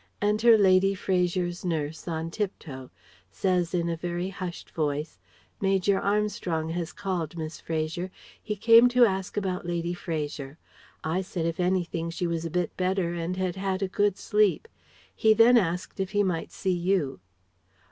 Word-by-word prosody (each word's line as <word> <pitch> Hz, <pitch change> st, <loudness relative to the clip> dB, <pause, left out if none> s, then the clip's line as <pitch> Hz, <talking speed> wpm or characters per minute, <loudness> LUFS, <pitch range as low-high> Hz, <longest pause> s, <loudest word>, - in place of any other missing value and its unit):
Enter 215 Hz, +3 st, +5 dB
Lady 195 Hz, -1 st, +4 dB
Fraser's 180 Hz, -1 st, 0 dB
nurse 160 Hz, -3 st, -3 dB
on 165 Hz, 0 st, -3 dB
tiptoe. 155 Hz, -, -5 dB, 0.4 s
Says 175 Hz, -, 0 dB
in 170 Hz, -2 st, 0 dB
a 170 Hz, -, -1 dB
very 175 Hz, +2 st, -3 dB
hushed 185 Hz, -3 st, -7 dB
voice 150 Hz, 0 st, -2 dB, 0.4 s
"Major 195 Hz, 0 st, +2 dB
Armstrong 200 Hz, -6 st, -1 dB
has 170 Hz, 0 st, -3 dB
called, 175 Hz, -4 st, -3 dB
Miss 155 Hz, 0 st, -6 dB
Fraser. 165 Hz, +3 st, -2 dB, 0.3 s
He 210 Hz, -, -3 dB
came 230 Hz, +3 st, +7 dB
to 245 Hz, 0 st, +6 dB
ask 190 Hz, -2 st, -2 dB
about 185 Hz, -3 st, -2 dB
Lady 170 Hz, 0 st, -1 dB
Fraser. 150 Hz, -4 st, -4 dB, 0.5 s
I 165 Hz, +4 st, 0 dB
said 180 Hz, -3 st, -4 dB
if 165 Hz, +1 st, -2 dB
anything 175 Hz, -2 st, 0 dB
she 170 Hz, +2 st, -3 dB
was 165 Hz, -1 st, -2 dB
a -, -, -2 dB
bit 175 Hz, 0 st, -1 dB
better 185 Hz, -2 st, 0 dB
and 170 Hz, +2 st, -3 dB
had 185 Hz, -1 st, -1 dB
had 190 Hz, 0 st, -1 dB
a -, -, +1 dB
good 200 Hz, 0 st, +1 dB
sleep. 210 Hz, -, +2 dB, 0.5 s
He 220 Hz, 0 st, +4 dB
then 230 Hz, +3 st, +7 dB
asked 180 Hz, -5 st, 0 dB
if 190 Hz, +1 st, -2 dB
he 205 Hz, 0 st, +3 dB
might 180 Hz, -4 st, -2 dB
see 190 Hz, -2 st, -1 dB
you." 175 Hz, -, 0 dB
180 Hz, 160 wpm, -27 LUFS, 165-195 Hz, 0.5 s, came